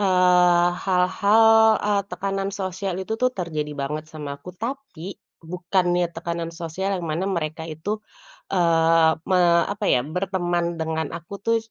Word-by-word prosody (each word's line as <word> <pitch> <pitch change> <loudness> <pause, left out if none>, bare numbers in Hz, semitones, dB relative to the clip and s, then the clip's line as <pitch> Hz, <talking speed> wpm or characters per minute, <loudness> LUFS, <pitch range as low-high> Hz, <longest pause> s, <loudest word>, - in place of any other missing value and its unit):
eee, 180 -2 +4 0.2
hal-hal, 195 +4 +3 0.4
eee, 205 -1 +2
tekanan 195 0 -3
sosial 190 0 -3
itu 190 +3 -4
tuh 255 - +4
terjadi 155 -4 -3
banget 150 +2 -3
sama 145 -2 -7
aku, 180 +4 -11
tapi 225 - -6 0.2
bukannya 175 +1 0
tekanan 170 0 -4
sosial 180 +4 -3
yang 180 - -5
mana 175 +5 -1
mereka 160 -3 -3
itu, 160 +6 -5 0.6
eee, 165 -2 +4 0.2
me 185 -1 +3 0.3
apa 205 +1 -5
ya, 125 - +4
berteman 175 -2 -1
dengan 160 -1 -2
aku 170 +4 -10
tuh, 230 0 +3
175 Hz, 140 wpm, -23 LUFS, 165-190 Hz, 0.6 s, eee